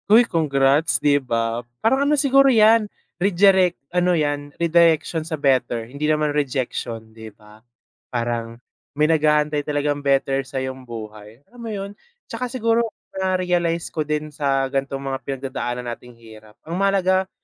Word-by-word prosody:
Uy, 230 +3 +7
congrats, 145 -4 +2
di 145 -1 +2
ba? 115 -2 -1 0.2
Parang 270 +5 +2
ano 300 - +4
siguro 275 -1 +4
yan, 220 -2 +5 0.3
rejirect 190 -1 +4 0.2
ano 180 0 +2
yan, 145 -1 -1
redirection 165 -1 +2
sa 160 0 -5
better 130 -5 +1
hindi 140 +5 -3
naman 150 -1 +1
rejection, 120 -5 -3
di 110 0 -10
ba? 105 +1 -19 0.5
Parang 115 -1 -3 0.4
may 150 - +4
nag-aantay 150 -1 +2
talagang 145 0 -1
better 135 -1 +1
sa'yong 130 -1 -5
buhay, 110 +2 -10
alam 245 - -18
mo 230 - -6
yon? 200 -2 -5 0.3
Tsaka 245 +2 -5
siguro 230 -2 +1 0.3
na-realize 180 -3 -1
ko 155 - -1
din 150 0 -3
sa 135 -2 0
ganitong 135 0 -2
mga 135 -1 -3
pinagdadaanan 130 -2 -4
nating 120 0 -14
hirap, 110 -2 -16
ang 165 - -5
mahalaga, 190 -1 +2
150 Hz, 145 wpm, -21 LUFS, 130-180 Hz, 0.5 s, Uy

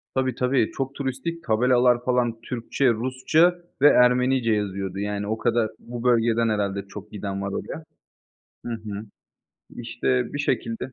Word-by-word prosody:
Tabii, 130 -2 0
tabii, 125 -3 +1
çok 135 0 -4
turistik, 140 +5 -4
tabelalar 125 0 +3
falan 120 -2 0
Türkçe, 125 +2 -1
Rusça 130 +9 +2 0.3
ve 145 - +8
Ermenice 125 -2 +4
yazıyordu. 100 -2 -3
Yani, 105 0 -3
o 110 +1 -1
kadar 115 -2 +1
bu 120 0 -7
bölgeden 115 -1 +3
herhâlde 100 -2 -1
çok 105 +1 -10
giden 100 -1 -4
var 100 0 -3
oraya. - - -5 0.8
Hı 120 - -3
hı. 105 -2 -6 0.7
İşte, 120 +1 -2
bir 145 - -4
şekilde 125 -2 -2
120 Hz, 145 wpm, -24 LUFS, 105-130 Hz, 0.8 s, ve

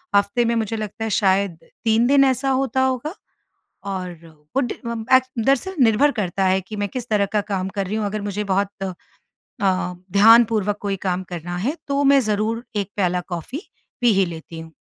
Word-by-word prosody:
हफ़्ते 205 +4 +2
में 235 0 +1
मुझे 225 -1 -1
लगता 215 +1 -5
है 225 - -1
शायद 195 -3 +2 0.3
3 225 +1 +3
दिन 275 +1 +5
ऐसा 265 +1 +1
होता 265 0 +1
होगा। 260 +6 -1 0.7
और 180 -3 -5 0.4
वो 270 - +3
ड़ 245 - -2 0.4
ऐ - - +8 0.2
दरअसल 275 +11 +1
निर्भर 235 +6 +4
करता 195 -5 -1
है 190 +1 +2
कि 200 +4 -9
मैं 205 -1 -2
किस 245 +1 -5
तरह 210 -2 +2
का 210 - +3
काम 190 -1 -1
कर 200 -1 -1
रही 205 - -3
हूँ। 215 -1 -1
अगर 210 +1 -3
मुझे 205 0 -3
बहुत 200 0 0 0.9
अ, 185 -2 +1 0.2
ध्यानपूर्वक 215 -1 +5
कोई 200 -1 -2
काम 185 -1 -1
करना 175 +1 -5
है 245 - -1
तो 280 0 +1
मैं 275 0 +6
ज़रूर 220 +1 -1
1 200 -1 -1
प्याला 180 -3 +1
कॉफ़ी, 180 - -5 0.4
पी 240 -2 +4
ही 195 -1 +3
लेती 165 -1 -8
हूँ। 160 0 -12
210 Hz, 190 wpm, -22 LUFS, 190-240 Hz, 0.9 s, ऐ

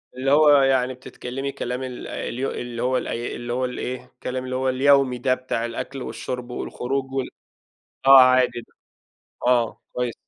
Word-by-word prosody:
اللي 135 +2 0
هو 150 +1 +6
يعني 130 -1 +2
بتتكلمي 130 +1 -6
كلام 125 -1 -4
ال 125 -1 -6
اليو 130 +3 -3
اللي 120 -1 -5
هو 130 +1 +2
ال - - -3
اللي 120 0 -4
هو 130 +1 0
ال 125 - -5
إيه، 125 0 -4
الكلام 130 0 -6
اللي 130 0 -4
هو 130 0 0
اليومي 135 -1 +3
ده 130 +1 +1
بتاع 130 -2 -3
الأكْل 125 +3 -5
والشُّرب 125 -1 -5
والخروج 130 +2 -3
وال 135 -1 -2 0.8
آه 135 -1 +10
عادي، 125 -2 +4 0.8
آه 120 -2 +2
كويس. 125 -2 -2
130 Hz, 165 wpm, -23 LUFS, 125-130 Hz, 0.8 s, آه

